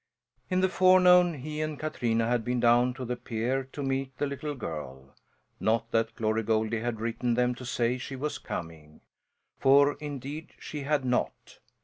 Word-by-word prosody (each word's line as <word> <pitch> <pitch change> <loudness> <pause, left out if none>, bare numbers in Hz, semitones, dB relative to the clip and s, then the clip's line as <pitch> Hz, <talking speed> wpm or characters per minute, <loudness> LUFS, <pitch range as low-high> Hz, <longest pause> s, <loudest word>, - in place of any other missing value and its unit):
In 185 -1 +1
the 190 - +4
forenoon 180 -2 +5
he 150 +3 -5
and 155 -1 -3
Katrina 115 -7 -1
had 120 -1 +1
been 125 +1 -1
down 120 +1 +4
to 130 -2 -5
the 125 +1 -2
pier 120 +3 -2
to 145 - -5
meet 135 -1 -2
the - - 0
little 145 +1 -4
girl. 70 - -7 0.5
Not 115 +1 0
that 115 0 0
Glory 110 -1 0
Goldie 110 0 0
had 115 -1 -3
written 115 +1 -1
them 125 0 +2
to 125 +1 -10
say 120 +1 0
she 135 - -6
was 145 +3 -3
coming, 80 -2 -7 0.6
for 140 +2 +5
indeed 145 +1 -6
she 150 - -7
had 140 -1 0
not! 125 -1 -2
125 Hz, 170 wpm, -28 LUFS, 115-145 Hz, 0.6 s, forenoon